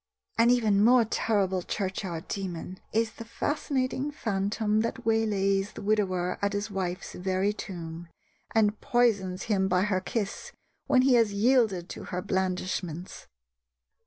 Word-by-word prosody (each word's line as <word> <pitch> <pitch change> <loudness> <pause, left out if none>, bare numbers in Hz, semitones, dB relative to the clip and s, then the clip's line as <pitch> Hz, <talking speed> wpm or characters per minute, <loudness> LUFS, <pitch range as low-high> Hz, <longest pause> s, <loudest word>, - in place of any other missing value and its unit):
An 230 +1 +6
even 215 -5 +4
more 240 +1 +6
terrible 195 -4 0
churchyard 185 -3 -4
demon 185 -1 -5
is 225 0 +1
the 230 - -9
fascinating 265 +2 -1
phantom 210 -4 0
that 230 - -3
waylays 205 -3 +1
the - - -8
widower 185 -4 0
at 200 0 0
his 205 +1 -2
wife's 185 -1 -3
very 190 +2 0
tomb, 170 -4 -7 0.5
and 210 -1 +3
poisons 200 -7 +1
him 195 -3 +1
by 180 -1 +2
her 195 -3 +1
kiss 205 0 -4 0.3
when 255 -1 +4
he 265 -1 +5
has 230 -4 +4
yielded 210 -5 +2
to - - -7
her 180 - -3
blandishments. 185 -2 -3
200 Hz, 135 wpm, -28 LUFS, 185-225 Hz, 0.5 s, An